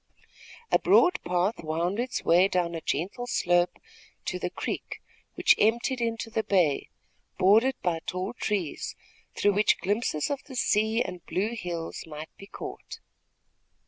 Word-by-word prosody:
A - - +5
broad 360 - +4
path 180 +3 0
wound 170 +6 -1
its 250 +1 -2
way 180 +3 +6
down 175 -3 0
a 165 - -4
gentle 195 - -2
slope 175 -6 +2 0.5
to - - -2
the - - -2
creek, - - -5 0.4
which 485 - +5
emptied 235 +3 +2
into 230 -1 -2
the 220 - +1
bay, 175 -9 +1 0.5
bordered 220 +8 +5
by 170 -2 +1
tall 185 +4 -3
trees, 200 -9 -2 0.4
through 205 - +3
which 210 +1 +3
glimpses 205 - -1
of 285 -1 -2
the 265 - -10
sea 220 0 +2
and 180 -1 -7
blue 210 +5 -1
hills 170 -6 -5
might 155 0 -9
be 195 - -12
caught. - - -8
195 Hz, 145 wpm, -27 LUFS, 175-230 Hz, 0.5 s, way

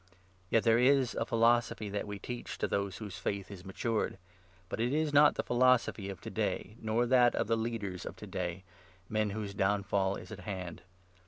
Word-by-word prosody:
Yet 115 - +3
there 115 0 +4
is 130 0 +4
a 115 - -2
philosophy 115 -1 +2
that 105 +1 -3
we 105 0 -5
teach 120 +4 -6
to - - 0
those 100 -1 -1
whose 105 -4 -7
faith 100 -2 -3
6 100 -2 -8
is - - -14
matured, 110 +3 -1 0.5
but - - -5
it 120 +3 +1
is 155 -1 0
not 145 +1 +6
the - - -1
philosophy 120 -5 +2
of 95 -3 -6
to - - -7
day, 105 - -2
nor 110 +2 +1
that 120 -1 +5
of - - +1
the 115 - +1
leaders 110 -5 -3
of - - -7
to - - -9
day 90 0 -4 0.2
— 95 0 -29
men 110 -1 +1
whose 100 -1 -4
downfall 100 -1 +1
is - - -9
at 105 - -7
hand. 95 -5 -6
110 Hz, 210 wpm, -32 LUFS, 100-120 Hz, 0.5 s, not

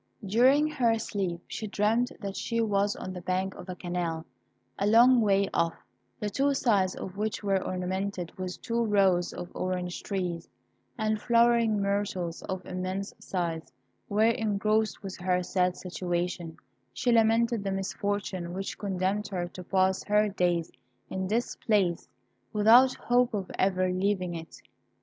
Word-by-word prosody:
During 255 +9 +4
her 240 -7 +2
sleep, 190 -6 -3
she 215 - -5
dreamt 215 +4 +1
that 200 -1 -4
she 230 -1 -2
was 205 -2 +1
on 185 - -6
the 180 - -7
bank 185 +2 -1
of 180 +1 -11
a 180 - -4
canal, 175 -2 -3 0.5
a 200 - +1
long 240 +3 +6
way 200 -2 +3
off, 170 0 +1 0.4
the 210 - -2
two 275 +4 +1
sides 200 -8 +2
of 190 +1 -7
which 215 0 -2
were 195 -2 +1
ornamented 185 -1 -3
with 185 -1 -5
two 235 0 0
rows 195 -5 +3
of 175 0 -7
orange 180 -1 -3
trees 180 -4 -3 0.5
and 215 -1 0
flowering 235 -2 +3
myrtles 200 -4 -1
of 185 -2 -5
immense 185 +2 -4
size, 170 -5 -3 0.4
where, 215 +3 +3
engrossed 215 0 0
with 195 -1 -6
her 180 0 0
sad 180 0 0
situation, 175 -1 -3 0.3
she 240 - 0
lamented 230 -1 +3
the 195 - -2
misfortune 195 -2 -3
which 195 +1 -5
condemned 195 +1 -1
her 180 -3 -3
to 180 +1 -9
pass 190 +1 +1
her 210 0 +3
days 175 -4 0 0.4
in 190 0 -2
this 230 +5 -1
place 195 -6 +1 0.4
without 235 +5 +6
hope 245 -1 +2
of 195 -3 -4
ever 185 -1 +2
leaving 185 -1 0
it. 165 -1 -9
195 Hz, 150 wpm, -28 LUFS, 180-215 Hz, 0.5 s, long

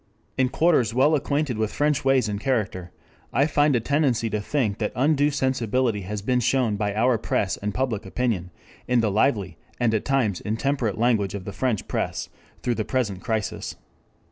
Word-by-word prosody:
"In 130 -1 +2
quarters 130 -8 +2
well 140 +5 +4
acquainted 140 -4 0
with 110 -1 0
French 150 -1 +1
ways 135 -3 +3
and 105 -1 -3
character 100 -9 -1 0.4
I 140 - +3
find 145 -2 +3
a - - +3
tendency 125 -3 +1
to 105 0 -1
think 110 -3 -1
that 105 - -1
undue 145 +2 +3
sensibility 125 -5 0
has 100 +2 -5
been 125 +2 +2
shown 120 -2 +1
by 100 -1 -2
our 120 +1 +2
press 100 -2 0
and 105 +1 -3
public 120 -2 -1
opinion 95 -3 -2 0.4
in 125 -1 +3
the 110 -2 +1
lively 100 - +1 0.2
and 120 -2 +2
at 110 - 0
times 125 -9 0
intemperate 115 0 -1
language 110 -5 +1
of 95 -2 -6
the 100 - -6
French 125 -6 -1
press - - -2 0.3
through 120 - +1
the 110 - -2
present 105 -7 -2
crisis. 110 -4 -3
120 Hz, 180 wpm, -24 LUFS, 105-135 Hz, 0.4 s, well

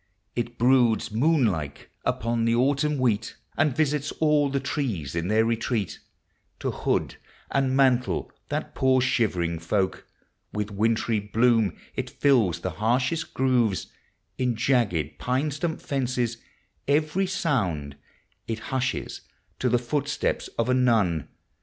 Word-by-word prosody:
It 120 0 -3
broods 120 -3 +3
moon 140 +5 +3
like 75 -9 -3
upon 115 0 0
the 115 0 +3
Autumn 140 +4 +2
wheat, 115 -4 0 0.2
And 145 -3 +2
visits 150 -2 +1
all 150 -2 +2
the 140 0 0
trees 115 - -3
in 85 +1 -2
their 110 +2 +3
retreal 115 -3 0 0.7
To - - -1
hood - - -1 0.3
and 135 -1 +1
mantle 125 -2 +2 0.2
that - - -3
poor 130 -1 +3
shivering 90 -10 +1
folk. 95 +3 -1 0.5
With 105 0 -3
wintry 110 +2 +1
bloom 110 -2 +2 0.2
it - - -3
fills 110 - +2
the 95 - -2
liarshost 125 - 0
gTOOVefl 125 -7 +1 0.5
In 125 -2 +1
jagged 110 - +1
pine 130 +4 0
stump 160 +3 -2
fences. 125 -4 -1 0.5
K\< 140 - +4
r\ 155 - 0 0.4
Bound 90 - 0 0.5
It 115 - -2 0.2
hushes 130 0 -2 0.4
to 125 - +1
the 120 - +3
footstep 140 +4 -1 0.2
of 115 - +1
a 130 - +3
nun. 110 - +2
120 Hz, 135 wpm, -26 LUFS, 105-135 Hz, 0.7 s, K\<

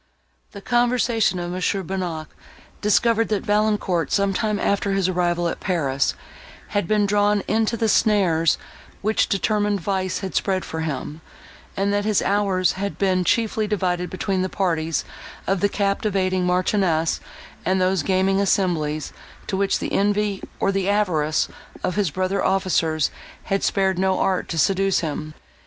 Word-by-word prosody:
The 200 - -9
conversation 240 -4 +2
of 175 0 -4
Mons. 180 0 0
Bonnac 180 -4 -4 0.5
discovered, 225 +2 +3
that 210 -2 0
Valancourt, 210 -5 +1
some 200 -1 +2
time 210 +2 0
after 200 0 0
his 195 -2 +1
arrival 175 -1 0
at - - -3
Paris, 140 -8 0 0.5
had 205 -5 -1
been 210 0 +2
drawn 205 0 +2
into 220 +2 +1
the 225 - +1
snares, 190 -7 +3 0.5
which 215 +2 +1
determined 205 0 +1
vice 185 +1 -2
had 190 -2 -5
spread 190 -2 0
for 160 - -5
him, 155 0 -4 0.6
and 200 +1 +1
that 205 0 +1
his 210 -1 +1
hours 195 -3 +2
had 200 +1 -4
been 185 -2 +2
chiefly 220 +2 +1
divided 180 -3 -1
between 185 0 -1
the 185 - -1
parties 165 -5 -1 0.4
of 195 -1 +1
the 205 - +2
captivating 195 -3 0
Marchioness 180 -3 +1 0.4
and 190 +1 +1
those 185 -1 +2
gaming 190 +4 +2
assemblies, 160 -7 0 0.3
to 195 - -2
which 195 0 +1
the - - -4
envy, 205 0 +1 0.2
or 195 - +2
the 195 0 0
avarice, 165 -7 +1 0.4
of 180 - 0
his 205 -3 +1
brother 185 +4 -1
officers 165 -5 +1 0.3
had 195 0 -1
spared 190 -2 +1
no 190 0 +2
art 185 -2 0
to 165 - -3
seduce 195 +3 +2
him. 155 -1 -4
190 Hz, 150 wpm, -22 LUFS, 180-205 Hz, 0.6 s, discovered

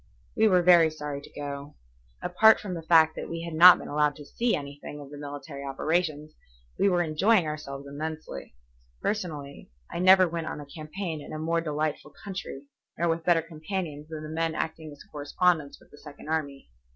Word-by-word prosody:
We 220 - +4
were 180 -3 +4
very 170 -2 +7
sorry 150 -2 -6
to - - -15
go. 140 0 -6 0.5
Apart 220 +5 +5
from 195 -3 -5
the 170 - -5
fact 160 -1 +5
that - - -6
we 165 0 -5
had 170 -1 -6
not 175 +3 +9
been - - -9
allowed 150 0 +1
to 145 - -11
see 235 +9 0
anything 145 0 -7
of 140 -1 -11
the 145 - -9
military 145 0 -7
operations, 155 +2 -1 0.5
we 200 - +4
were 175 -2 +2
enjoying 175 +5 +3
ourselves 145 -2 -6
immensely. 150 - -6 0.4
Personally, 155 -9 -4 0.2
I - - -4
never 185 0 +7
went 165 -1 -4
on - - -5
a 145 - -8
campaign 155 +2 -6
in - - -10
a - - -4
more 165 +2 0
delightful 150 -1 -3
country 190 -8 -6 0.3
nor 170 +1 +1
with 165 0 -1
better 165 -1 +3
companions 160 -2 -5
than 155 -1 -6
the 155 - -7
men 165 0 -1
acting 160 -1 -4
as 145 - -13
correspondents 150 +1 0
with - - -23
the 145 - -15
Second 150 0 -11
Army. 140 - -3
155 Hz, 190 wpm, -27 LUFS, 145-170 Hz, 0.5 s, not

